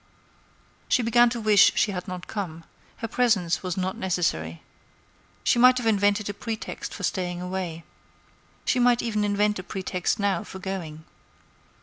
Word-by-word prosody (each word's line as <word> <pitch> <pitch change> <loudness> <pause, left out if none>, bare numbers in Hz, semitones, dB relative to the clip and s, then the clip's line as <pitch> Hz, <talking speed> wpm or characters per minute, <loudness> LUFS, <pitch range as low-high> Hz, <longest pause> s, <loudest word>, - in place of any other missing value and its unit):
She 250 - +3
began 240 +1 +5
to 235 0 -4
wish 215 -2 +5
she 210 - +2
had 180 -2 -5
not 180 -1 -6
come; 170 -6 -5 0.3
her 230 - -5
presence 210 -8 +1
was 185 -1 -4
not 185 0 -1
necessary. 125 - -2 0.8
She 240 - +3
might 255 +1 +7
have 245 - -2
invented 205 -1 +2
a 205 - -3
pretext 220 +1 -5
for 200 - -8
staying 180 -1 -2
away; 180 -2 -4 0.8
she 250 - +2
might 245 -1 +3
even 215 -3 0
invent 205 0 +1
a - - -6
pretext 185 -2 -2
now 200 +1 0
for 190 - -9
going. 175 -5 -6
200 Hz, 155 wpm, -25 LUFS, 180-220 Hz, 0.8 s, might